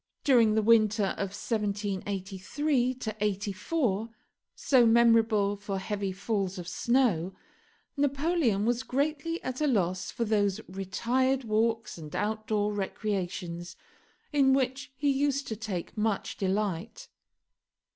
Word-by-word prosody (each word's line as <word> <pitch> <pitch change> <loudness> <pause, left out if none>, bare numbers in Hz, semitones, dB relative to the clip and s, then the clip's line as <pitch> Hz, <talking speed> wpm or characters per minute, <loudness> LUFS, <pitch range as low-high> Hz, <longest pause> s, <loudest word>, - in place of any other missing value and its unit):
During 235 -6 +5
the 220 - +2
winter 215 -2 +4
of 200 - -1
1783 205 +5 -2 0.2
84, 210 - -1 0.5
so 255 -4 +4
memorable 225 -3 +4
for 200 -1 -4
heavy 200 0 -3
falls 195 0 -2
of 175 -1 -6
snow, 195 -3 +1 0.6
Napoleon 280 - +1
was 240 0 +1
greatly 300 +7 -1
at 255 +2 -4
a 300 - +3
loss 185 -7 0
for 235 - -2
those 205 -2 +1
retired 240 +8 0
walks 225 -2 0
and 150 -2 -8
outdoor 215 0 -1
recreations 180 -4 -3 0.6
in 275 -2 +4
which 265 -1 -1
he 290 -1 +2
used 280 0 0
to 220 - -2
take 205 -5 -5
much 215 -2 -1
delight. 200 - -2
215 Hz, 115 wpm, -29 LUFS, 195-255 Hz, 0.6 s, During